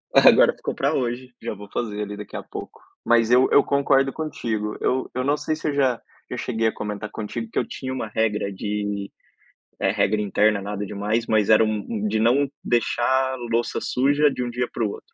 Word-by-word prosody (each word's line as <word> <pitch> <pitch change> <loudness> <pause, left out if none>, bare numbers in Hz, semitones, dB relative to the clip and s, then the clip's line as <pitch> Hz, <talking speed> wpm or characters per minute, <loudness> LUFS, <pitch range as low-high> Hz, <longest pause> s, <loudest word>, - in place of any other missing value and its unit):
agora - - +7
ficou - - -4
pra 140 +3 0
hoje, 125 -1 -2
já - - -3
vou 105 0 -11
fazer 105 -3 -3
ali 105 0 -6
daqui 105 - -9
a - - -6
pouco, - - -9 0.3
mas 115 -1 +4
eu 125 +1 +5
eu 145 - +7
concordo 135 -1 +2
contigo, 110 -9 -3
eu 130 +1 0
eu 130 +1 -1
não 145 +2 +2
sei 155 - -2
se 155 - -5
eu 145 - -1
já 130 -4 +2 0.3
eu - - -4
cheguei 115 -2 0
a - - 0
comentar 105 0 -5
contigo 110 - -5
que - - 0
eu - - -2
tinha 130 - -5
uma 125 -4 -3
regra 105 -2 0
de, 100 0 -3 0.7
eh, - - +2
regra 105 +2 +1
interna, 105 0 +2
nada 105 +1 -4
demais, 105 +4 -1
mas 110 -2 +2
era 110 0 +7
um 110 -1 -1
um 215 -2 -2
de 110 - 0
não 130 +5 +3 0.2
deixar 130 +2 +1 0.2
louça 115 +1 0
suja 145 +3 +3
de 125 - -3
um 120 - -3
dia 125 +1 -2
pro 115 -3 -1
outro. - - -12
115 Hz, 210 wpm, -23 LUFS, 105-130 Hz, 0.7 s, agora